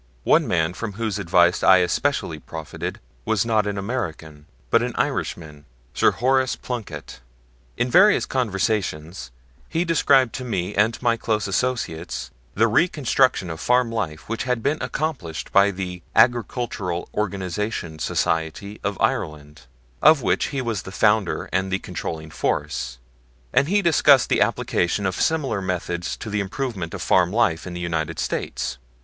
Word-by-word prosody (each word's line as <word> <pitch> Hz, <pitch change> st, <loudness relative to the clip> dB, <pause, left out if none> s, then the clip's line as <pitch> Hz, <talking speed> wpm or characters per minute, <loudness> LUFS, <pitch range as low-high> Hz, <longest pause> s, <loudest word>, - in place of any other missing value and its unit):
One -, -, +4 dB
man 80 Hz, 0 st, +1 dB
from 105 Hz, +2 st, -5 dB
whose 110 Hz, -1 st, -2 dB
advice 85 Hz, -1 st, +3 dB
I 95 Hz, -, +7 dB
especially 90 Hz, -1 st, 0 dB
profited 80 Hz, -2 st, -6 dB, 0.2 s
was 110 Hz, -, +1 dB
not 110 Hz, -3 st, +2 dB
an 100 Hz, -1 st, -2 dB
American, 80 Hz, -, -5 dB, 0.2 s
but -, -, +5 dB
an -, -, -2 dB
Irishman, 75 Hz, -3 st, -3 dB, 0.3 s
Sir -, -, +4 dB
Horace 130 Hz, +1 st, +1 dB
Plunkett. 100 Hz, -, -7 dB, 0.6 s
In 120 Hz, 0 st, 0 dB
various 210 Hz, +8 st, +6 dB
conversations 95 Hz, -, -2 dB, 0.4 s
he 165 Hz, +2 st, 0 dB
described 140 Hz, -7 st, +3 dB
to 130 Hz, -, -5 dB
me 95 Hz, -8 st, -2 dB
and 110 Hz, +3 st, +2 dB
my 120 Hz, -1 st, +3 dB
close 110 Hz, -2 st, -1 dB
associates 85 Hz, -, -2 dB, 0.2 s
the 115 Hz, +3 st, +4 dB
reconstruction 130 Hz, -, +2 dB
of 80 Hz, -, -7 dB
farm 125 Hz, +2 st, +2 dB
life 90 Hz, -10 st, -4 dB
which 115 Hz, +3 st, -3 dB
had 125 Hz, -3 st, -1 dB
been 150 Hz, +2 st, 0 dB
accomplished 130 Hz, -, -3 dB
by 100 Hz, +1 st, +5 dB
the 90 Hz, -2 st, -5 dB
Agricultural 115 Hz, -7 st, +1 dB
Organization 95 Hz, -4 st, -3 dB
Society 80 Hz, +8 st, -2 dB
of 100 Hz, -1 st, -2 dB
Ireland, 75 Hz, -3 st, -2 dB, 0.3 s
of 155 Hz, -2 st, +6 dB
which -, -, +1 dB
he 135 Hz, -3 st, -3 dB
was 115 Hz, -5 st, -2 dB
the 95 Hz, -, -9 dB
founder 105 Hz, -1 st, +1 dB
and 95 Hz, +1 st, 0 dB
the 95 Hz, -, +2 dB
controlling 80 Hz, -4 st, -6 dB
force; -, -, -2 dB, 0.6 s
and 140 Hz, -, +4 dB
he 200 Hz, +3 st, +2 dB
discussed 145 Hz, -6 st, +5 dB
the -, -, +2 dB
application 90 Hz, +4 st, +1 dB
of 95 Hz, -, 0 dB
similar 140 Hz, -11 st, 0 dB
methods 90 Hz, -1 st, -3 dB
to 110 Hz, -, -7 dB
the 105 Hz, -, 0 dB
improvements 100 Hz, -3 st, -3 dB
of -, -, -5 dB
farm 90 Hz, -1 st, +3 dB
life 100 Hz, -7 st, +1 dB
in 90 Hz, -, -6 dB
the -, -, -5 dB
United 80 Hz, -3 st, -2 dB
States. 60 Hz, -, -3 dB
100 Hz, 150 wpm, -23 LUFS, 85-120 Hz, 0.6 s, I